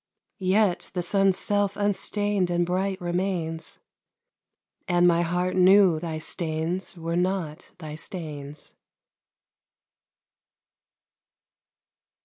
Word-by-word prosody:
Yet 190 0 +1
the 180 - -1
sun's 195 +1 +2
self 205 -1 0
unstain'd 205 -1 0
and 175 0 +1
bright 185 +2 -1
remains, 175 -2 -3 1.1
And 175 -1 +4
my 170 -1 +4
heart 180 +2 -1
knew 185 -2 +6
thy 160 -1 -4
stains 165 +3 -3
were 165 0 -3
not 180 -4 -2
thy 155 -3 -8
stains. 150 -3 -8
180 Hz, 90 wpm, -25 LUFS, 165-190 Hz, 1.1 s, knew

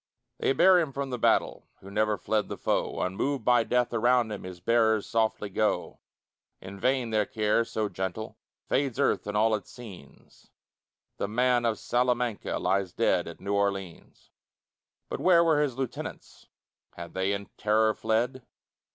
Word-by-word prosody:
They - - +1
bear 185 +6 +6
him 160 -5 -1
from 140 -1 -4
the 125 - -3
battle - - +1
Who 95 - -11
never 105 0 +1
fled 105 +2 -1
the - - -5
foe; - - -1
Unmoved 115 +7 -2
by 120 -1 +4
death 125 +1 0
around 120 0 +3
them 105 -3 -6
His 90 -1 -8
bearers 110 +2 +2
softly 110 -2 0
go. 105 +2 -1 0.6
In 95 +1 -10
vain 125 0 0
their 105 -2 +1
care, 110 +1 +1
so 110 -2 -2
gentle, 95 +3 -5 0.3
Fades 135 -2 -1
earth 140 - +1
and 105 0 -2
all 110 +1 +3
its 105 - -3
scenes; 110 -7 -14 0.7
The - - -2
man 120 +2 +2
of 115 -2 +1
Salamanca 125 -2 -1
Lies 95 -2 0
dead - - +1
at - - -9
New 100 +1 -3
Orleans. 100 -3 -3 0.8
But - - -5
where 175 -2 +5
were 160 -3 +3
his 135 -5 -1
lieutenants? 135 -3 -6 0.5
Had 85 0 -9
they 95 +1 0
in 100 0 -3
terror 110 +1 +2
fled? 120 +5 -1
110 Hz, 160 wpm, -28 LUFS, 100-125 Hz, 0.8 s, bear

